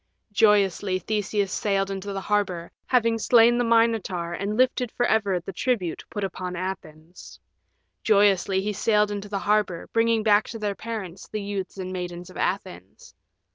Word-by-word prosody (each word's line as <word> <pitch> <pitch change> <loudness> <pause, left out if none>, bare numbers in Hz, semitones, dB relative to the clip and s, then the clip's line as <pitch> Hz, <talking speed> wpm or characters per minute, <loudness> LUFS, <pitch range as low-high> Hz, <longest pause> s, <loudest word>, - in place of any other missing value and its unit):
Joyously 205 -3 +3
Theseus 205 +1 -1
sailed 195 -1 0
into 195 +1 -5
the 195 0 -4
harbor, 190 -5 -1 0.2
having 230 -2 +2
slain 235 +1 +5
the - - +2
Minotaur 225 -7 +1
and 205 +2 -3
lifted 250 -2 +2
for 245 - +1
ever 205 -6 +1
the 185 +3 -8
tribute 215 -10 -1
put 205 - -4
upon 185 -1 -4
Athens. 175 -2 -8 0.6
Joyously 200 -2 +3
he 210 +1 -2
sailed 210 0 +2
into 205 0 -5
the 200 - -2
harbor, 205 -4 0
bringing 230 -1 +2
back 210 -1 +4
to 225 - -6
their 210 -2 -2
parents 195 -5 -7
the 215 -1 -5
youths 200 -2 -5
and 185 -1 -5
maidens 180 0 -6
of - - -12
Athens. 95 - -4
200 Hz, 160 wpm, -25 LUFS, 185-220 Hz, 0.6 s, slain